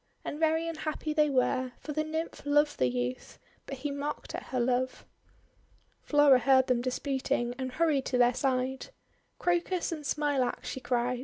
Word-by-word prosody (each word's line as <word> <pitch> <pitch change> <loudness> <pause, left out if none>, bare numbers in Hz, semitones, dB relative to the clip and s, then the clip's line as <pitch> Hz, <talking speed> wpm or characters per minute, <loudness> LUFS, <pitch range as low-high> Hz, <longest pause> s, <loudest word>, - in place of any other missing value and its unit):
And 295 - -4
very 320 +1 +2
unhappy 310 -1 -3
they 300 -1 +3
were, 255 -1 +1
for 300 - -6
the 310 +1 0
Nymph 320 +1 -4
loved 295 +1 +2
the 130 - +3
youth, 125 0 -3 0.3
but 275 - -5
he 285 +3 -3
mocked 285 +1 -4
at - - -5
her 255 - -2
love. 255 +1 0 1.0
Flora 290 -3 +5
heard 260 +1 +4
them 250 -2 +1
disputing 255 -1 -1
and 260 -1 -4
hurried 305 -3 +1
to 255 - 0
their 245 0 +5
side. 260 0 -1 0.5
'Crocus 350 0 0
and 310 -2 -5
Smilax!' 285 -4 0
she - - -4
cried. 245 0 -1
270 Hz, 165 wpm, -29 LUFS, 255-300 Hz, 1.0 s, Flora